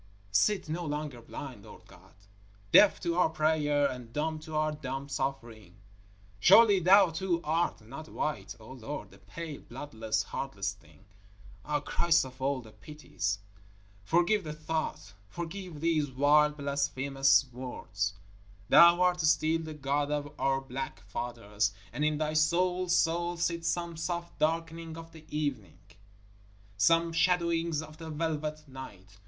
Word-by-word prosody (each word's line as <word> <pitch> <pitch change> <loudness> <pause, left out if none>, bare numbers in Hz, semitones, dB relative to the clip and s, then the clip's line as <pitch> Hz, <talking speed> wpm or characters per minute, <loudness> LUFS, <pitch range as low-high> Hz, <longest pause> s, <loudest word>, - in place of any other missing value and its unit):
_ - - -29 0.3
Sit 190 - +2
no 165 +3 -3
longer 150 -5 -4
blind, 120 -2 -8
Lord - - -14
God, - - -19 0.6
deaf 205 - +7
to 170 -2 -1
our 180 - +4
prayer 155 -2 +2
and 125 -3 -7
dumb 155 +4 -2
to 155 0 -8
our 155 0 +1
dumb 135 -2 -5
suffering. 120 -9 -4 0.6
Surely 200 - +7
Thou 185 +1 +6
too 175 0 -1
art 165 -3 0
not 140 +9 -10
white, 105 -11 -3
O 110 +3 -12
Lord, 135 +3 -7
a - - -17
pale, 165 -4 -8
bloodless, 115 -4 -3
heartless 100 -8 -4
thing? 80 -6 -22 0.6
Ah! 150 -1 -1
Christ 165 0 +2
of 130 0 -12
all 135 0 0
the 110 -2 -14
Pities! 105 - -4 0.7
Forgive 175 - +2
the 155 -2 -5
thought! 155 - -4 0.2
Forgive 170 - -7
these 160 -3 +1
wild, 150 +3 +3
blasphemous 140 -1 +2
words. 105 -6 -4 0.5
Thou 170 +1 +8
art 180 -1 +2
still 160 +1 +2
the 160 -1 -7
God 145 0 -1
of 145 0 -3
our 135 0 +1
black 135 -6 -6
fathers, 105 -1 -3 0.2
and 150 - -2
in 150 0 +1
Thy 155 0 -1
soul's 180 +3 +2
soul 175 +1 0
sit 170 0 -1
some 170 0 -1
soft 170 +1 -4
darkenings 165 +1 -1
of 165 0 -10
the 160 -1 -14
evening, 130 - -3 1.0
some 165 +11 +3
shadowings 170 -2 +1
of 155 0 -12
the 160 -1 -7
velvet 155 -1 -3
night. 100 -7 -11
150 Hz, 145 wpm, -30 LUFS, 130-165 Hz, 1.0 s, Thou